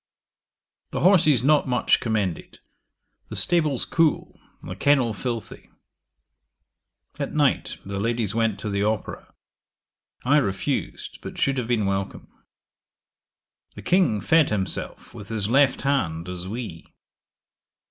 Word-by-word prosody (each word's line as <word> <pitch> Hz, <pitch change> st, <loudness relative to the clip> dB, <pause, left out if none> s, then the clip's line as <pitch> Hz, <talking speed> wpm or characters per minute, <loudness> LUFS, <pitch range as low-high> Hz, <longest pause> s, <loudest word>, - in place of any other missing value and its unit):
'The -, -, -3 dB
horses 155 Hz, -, +5 dB
not 145 Hz, +1 st, +3 dB
much 125 Hz, -1 st, +2 dB
commended. 105 Hz, -7 st, -2 dB, 0.7 s
The -, -, -6 dB
stables 155 Hz, -7 st, +1 dB
cool; 165 Hz, -2 st, 0 dB, 0.2 s
the 90 Hz, -, -6 dB
kennel 130 Hz, 0 st, +2 dB
filthy. 115 Hz, +1 st, -5 dB, 1.5 s
'At -, -, -3 dB
night -, -, +1 dB
the 100 Hz, 0 st, -4 dB
ladies 115 Hz, -1 st, -1 dB
went 115 Hz, -2 st, 0 dB
to 105 Hz, -, -3 dB
the 100 Hz, 0 st, -1 dB
opera. 105 Hz, 0 st, -3 dB, 0.9 s
I 145 Hz, +4 st, +4 dB
refused, 100 Hz, -9 st, -2 dB
but -, -, -8 dB
should 135 Hz, -1 st, +1 dB
have 120 Hz, -, -3 dB
been 115 Hz, -4 st, +1 dB
welcome. 95 Hz, 0 st, -3 dB, 1.5 s
'The -, -, -10 dB
King 180 Hz, -, +2 dB
fed 160 Hz, -2 st, +4 dB
himself 95 Hz, -3 st, -4 dB
with 105 Hz, 0 st, -10 dB
his 110 Hz, -1 st, -1 dB
left 135 Hz, 0 st, +3 dB
hand 90 Hz, -, 0 dB
as 90 Hz, 0 st, -5 dB
we. 105 Hz, -6 st, -6 dB
115 Hz, 120 wpm, -24 LUFS, 100-140 Hz, 1.5 s, horses